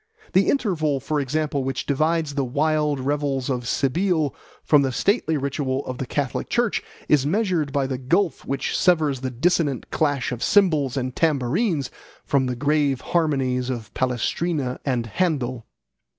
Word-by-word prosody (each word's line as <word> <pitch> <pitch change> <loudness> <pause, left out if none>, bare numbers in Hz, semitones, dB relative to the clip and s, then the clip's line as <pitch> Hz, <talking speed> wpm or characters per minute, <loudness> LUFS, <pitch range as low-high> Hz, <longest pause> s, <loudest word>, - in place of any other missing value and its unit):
The 190 +1 +4
interval, 160 - +1
for 150 +3 -1
example, 145 0 -1
which 135 0 -3
divides 155 +1 +1
the 140 -1 0
wild 150 +2 +1
revels 140 -1 -1
of 125 -2 -3
Cybele 155 - +1 0.3
from 150 -2 +5
the 135 -1 0
stately 160 - +1
ritual 140 -1 -2
of 130 -1 -5
the 130 - -3
Catholic 140 -1 -2
Church 240 -2 +1 0.3
is 150 -3 +4
measured 175 -5 0
by 140 -1 +1
the 130 -1 -3
gulf 170 +7 +1
which 135 - -2
severs 155 -7 +2
the 130 - -2
dissonant 145 +1 0
clash 145 -5 0
of 125 -1 -5
cymbals 155 - +3
and 130 -1 -2
tambourines 155 - +1 0.3
from 135 -2 +1
the 125 - -2
grave 145 0 +1
harmonies 135 -6 0
of 120 -4 -5
Palestrina 130 +2 -1
and 125 -4 -1
Handel. 130 - -1
140 Hz, 150 wpm, -23 LUFS, 130-160 Hz, 0.3 s, from